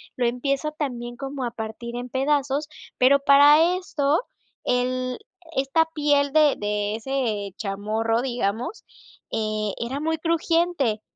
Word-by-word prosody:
lo 250 - 0
empiezo 275 +5 -1
también 245 -6 -4
como 270 +1 -5
a 240 - -3
partir 235 +1 -6
en 245 +1 -5
pedazos, 280 +2 0 0.3
pero 270 +2 +5
para 295 +5 +6
esto 315 -5 0 0.4
el 255 0 -1 0.4
esta 275 +5 +2
piel 290 -2 +2
de 305 -2 +5
de 210 0 -1
ese 225 -4 -2
chamorro, 220 +3 -1
digamos, 245 - -2 0.5
eh, 215 -1 -1
era 250 +4 -3
muy 320 +2 -1
crujiente, 330 -7 +1
260 Hz, 125 wpm, -24 LUFS, 230-290 Hz, 0.5 s, para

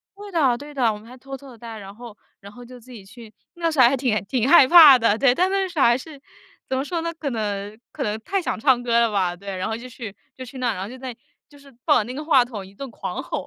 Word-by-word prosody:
对 410 0 -11
的 275 -9 +2
对 290 +2 -11
的， 245 -5 +1
我 210 - -6
们 215 +2 -16
还 250 - -12
偷 270 +1 -9
偷 275 +1 -14
地 235 - -15
带， 225 -1 -9
然 195 -1 -10
后 230 -1 -12 0.2
然 200 0 -13
后 245 +3 -13
就 250 +1 -13
自 250 +2 -17
己 210 -6 -12
去 230 +1 -14 0.2
那 335 -1 -1
时 310 -3 -3
候 250 - +8
还 265 - +2
挺 240 -6 -1
挺 250 +3 -1
害 305 -5 +7
怕 310 -4 +9
的， 230 -3 +2
对， 260 -1 +3
但 370 +2 +1
那 390 -1 0
时 345 - -13
候 280 - +4
还 235 - +5
是， 285 +2 -12 0.5
怎 260 - -2
么 265 - -1
说 335 +3 -3
呢？ 335 0 -4
可 315 -3 -5
能 210 -3 -4
可 - - -9
能 210 +1 -3
太 390 - -2
想 335 - -3
唱 245 +1 +3
歌 235 -1 +1
了 230 -1 +2
吧， 185 -4 0
对， 195 +1 -8
然 185 - -3
后 220 - -3
就 245 +2 -10
去 230 -5 -9 0.2
就 260 - -9
去 255 +1 -11
那 250 -1 -1
儿， - - -3
然 190 +3 -6
后 255 - -10
在 255 -2 -7 0.3
就 285 - -19
是 280 0 -18
抱 - - +4
着 - - -1
那 250 - -7
个 300 - -5
话 275 -6 +5
筒 215 -6 -8
一 190 - -16
顿 270 +6 -8
狂 - - -6
吼。 - - -5
245 Hz, 325 characters per minute, -22 LUFS, 220-280 Hz, 0.5 s, 怕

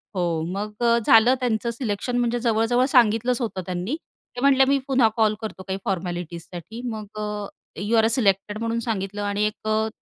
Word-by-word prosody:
हो 170 -3 0
मग 205 +3 -3
अ, 235 0 +4
झालं 230 +3 +6
त्यांचं 235 -2 0
सिलेक्शन 235 0 -2
म्हणजे 240 0 +1
जवळजवळ 235 +2 +2
सांगितलंच 245 -1 +3
होतं 215 -5 -3
त्यांनी. 185 +8 -3 0.4
ते 245 - -5
म्हटले, 270 -1 +5
"मी 280 +1 +4
पुन्हा 260 -4 +4
कॉल 215 -1 +3
करतो 215 -4 -6
काही 190 0 -2
फॉर्मॅलिटीजसाठी." 175 +3 -5
मग 215 -2 -5
अ, - - -2 0.6
"यू 215 +3 0
आर 220 - +5
अ, - - +5
सिलेक्टेड." 205 -3 +1
म्हणून 230 0 -1
सांगितलं 205 -1 -2
आणि 205 +1 -1
एक 215 0 -7
अ, 215 0 +1
220 Hz, 180 wpm, -24 LUFS, 195-240 Hz, 0.6 s, झालं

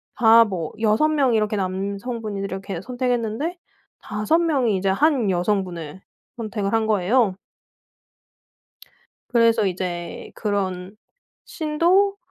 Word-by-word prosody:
다 230 -1 +7
뭐 175 -7 -4
6 220 +7 +3
명이 280 -6 +2
이렇게 215 0 0
남성분들이 200 +2 -3
이렇게 195 -2 -5
선택했는데 245 - -2 0.4
5 210 +9 0
명이 275 -10 +1
이제 190 +1 -2
1 260 +1 +2
여성분을 180 -3 -2 0.4
선택을 210 -3 -3
한 225 -1 +2
거예요. 215 +1 +2 2.0
그래서 230 -2 +3
이제 175 -2 -4
그런 195 -2 -3 0.5
scene도 345 +6 +2
215 Hz, 235 characters per minute, -22 LUFS, 190-245 Hz, 2.0 s, 다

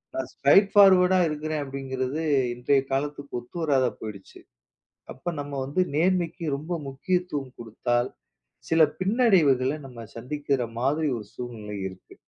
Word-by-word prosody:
நான் 130 -1 -2
ஸ்ட்ராயிட் 195 +8 +5
பார்வொர்ட்டா 185 -2 +7
இருக்கிறேன் 155 0 -3
அப்படிங்கறது 135 +1 -4 0.3
இன்றைய 130 +3 +2
காலத்துக்கு 140 +1 -3
ஒத்து 120 +8 -12
வராத 135 -5 +2
போயிருச்சு. 105 -3 -9 0.7
அப்போ 175 +7 -5
நம்ம 145 0 -7
வந்து 145 +7 -1
நேர்மைக்கு 170 0 +1
ரொம்ப 155 +5 -7 0.2
முக்கியத்துவம் 145 -2 -2
கொடுத்தால் 120 +2 -1 0.6
சில 160 -1 +6
பின்னடைவுகள 185 - +3
நம்ம 115 -3 -10
சந்திக்கிற 140 +1 -2 0.2
மாதிரி 145 +5 +1
ஒரு 105 - -9
சூழ்நிலை 110 -4 -7
இருக்கு. 95 - -15
140 Hz, 120 wpm, -26 LUFS, 130-165 Hz, 0.7 s, பார்வொர்ட்டா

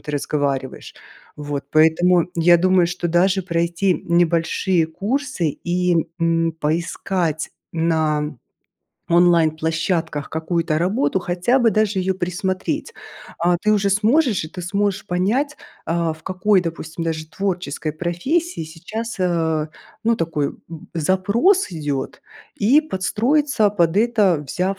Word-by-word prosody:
ты - - -7
разговариваешь. 140 -2 -2 0.4
Вот. 145 -1 -4
Поэтому 165 +3 +4
я 170 +1 +5
думаю, 185 0 +3
что 175 0 -3
даже 185 +3 +2
пройти 170 +2 0
небольшие 170 0 +1
курсы 210 - -2
и, 175 +1 0
м, 165 0 +1
поискать 160 +1 -2 0.3
на 155 -3 0 0.7
онлайн 170 -2 +5
площадках 160 -2 -1
какую-то 160 -1 -1
работу, 190 - +1
хотя 180 +9 +1
бы 235 -3 +4
даже 215 -2 +1
её 190 +1 0
присмотреть. 185 - -3 0.5
А, 175 +1 +2
ты 215 - +1
уже 200 -1 +2
сможешь 220 - +2
и 155 - -7
ты 180 +1 -8
сможешь 200 +2 -1
понять, 225 +12 0 0.3
а, 165 -1 0
в 160 - -19
какой, 190 +1 +2
допустим 165 0 -5
даже, 155 -1 -3
творческой 165 -4 -3
профессии 180 - -2
сейчас, 215 +9 -6
э, 160 -4 0 0.4
ну 230 0 +3
такой, 160 -5 -1 0.2
м, 165 -2 -10
запрос 200 - +2
идёт 145 -5 -4 0.3
и 255 +9 +4
подстроиться 250 +1 +1
под 175 -3 +1
это 210 -9 +2
взяв, 190 +4 -1
175 Hz, 125 wpm, -21 LUFS, 160-200 Hz, 0.7 s, я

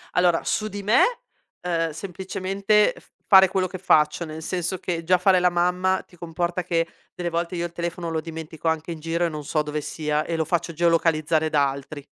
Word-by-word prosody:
allora, 175 -2 +3
su 215 0 -1
di 205 0 -6
me, 210 +4 +4 0.7
uhm, 165 -2 0
semplicemente 190 - 0
f - - -18 0.2
fare 190 -2 +8
quello 185 -1 0
che 185 +1 -7
faccio. 155 -2 +3
Nel 155 0 -7
senso 180 +2 -2
che, 170 -2 -3
già 180 +2 +4
fare 185 0 +4
la 180 - +4
mamma 180 +2 +1
ti - - -19
comporta 170 +1 -3
che 165 -1 0 0.3
delle 175 -1 -3
volte 170 +1 -2
io 170 - -1
il 170 - -7
telefono 170 0 -4
lo 160 -1 -2
dimentico 160 -1 -5
anche 160 +1 -2
in 160 -2 -7
giro 165 +2 0
e - - 0
non 150 -2 -6
so 155 +1 0
dove 150 0 -3
sia 150 0 -2
e 165 0 -3
lo 160 - 0
faccio 170 +1 -1
geolocalizzare 160 -1 +2
da 145 -2 +3
altri. 140 +1 -8
170 Hz, 205 wpm, -24 LUFS, 160-180 Hz, 0.7 s, fare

